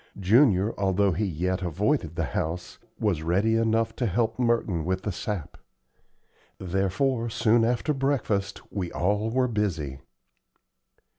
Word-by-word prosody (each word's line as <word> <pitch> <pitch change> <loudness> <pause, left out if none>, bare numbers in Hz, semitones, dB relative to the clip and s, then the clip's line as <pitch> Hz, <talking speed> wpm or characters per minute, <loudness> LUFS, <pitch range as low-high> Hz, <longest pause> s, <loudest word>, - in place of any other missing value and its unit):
Junior, 105 0 +4
although 100 0 +2
he 100 +5 -1
yet 90 +2 -1
avoided 90 - 0
the 80 - -1
house, 80 +5 -4 0.2
was 100 -8 0
ready 95 +7 +1
enough 115 0 +1
to 120 - 0
help 110 +3 0
Merton 115 -9 +1
with 95 +3 -2
the 105 - -2
sap. 95 -3 -5 1.0
Therefore 100 +7 0
soon 115 +1 +3
after 120 +6 +1
breakfast 120 -8 -1
we 90 -4 -3
all 105 +4 0
were 130 +2 +1
busy. 85 - -2
100 Hz, 130 wpm, -26 LUFS, 90-115 Hz, 1.0 s, Junior